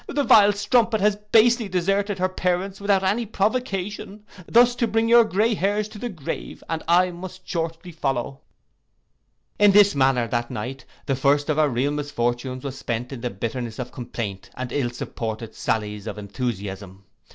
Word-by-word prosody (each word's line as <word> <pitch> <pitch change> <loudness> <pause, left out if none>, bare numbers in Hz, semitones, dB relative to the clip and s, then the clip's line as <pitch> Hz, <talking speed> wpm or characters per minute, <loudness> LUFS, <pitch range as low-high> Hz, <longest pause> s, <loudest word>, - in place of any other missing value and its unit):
The 285 0 0
vile 210 -4 +7
strumpet 220 +2 +2
has 205 +1 +3
basely 220 +2 +3
deserted 195 +2 0
her 185 0 +1
parents 185 +1 -2
without 200 -1 +2
any 205 +5 +1
provocation, 205 -1 -2 0.2
thus 240 +1 +5
to 235 - +1
bring 225 +1 +1
your 235 0 +7
grey 220 +2 +1
hairs 205 +2 0
to 215 -1 -11
the 245 - -4
grave, 165 -10 -6
and 165 -1 -2
I 180 +2 +4
must 185 +1 -10
shortly 165 +1 -4
follow.' 135 -4 -3 1.2
In 205 -1 +6
this 205 0 +6
manner 130 -3 +2
that 120 0 -1
night, 125 +3 -6 0.2
the 135 - 0
first 145 +3 +2
of 155 - 0
our 150 -1 +4
real 130 +3 0
misfortunes, 130 -3 -2
was 135 -2 -6
spent 120 +2 -3
in 130 -4 -7
the 125 - -2
bitterness 115 +2 -4
of 125 -1 -5
complaint, 110 -5 -6
and 125 -1 -5
ill 130 -3 0
supported 115 -2 -5
sallies 105 -1 -2
of - - -5
enthusiasm. 100 -3 -5
165 Hz, 170 wpm, -23 LUFS, 125-205 Hz, 1.2 s, vile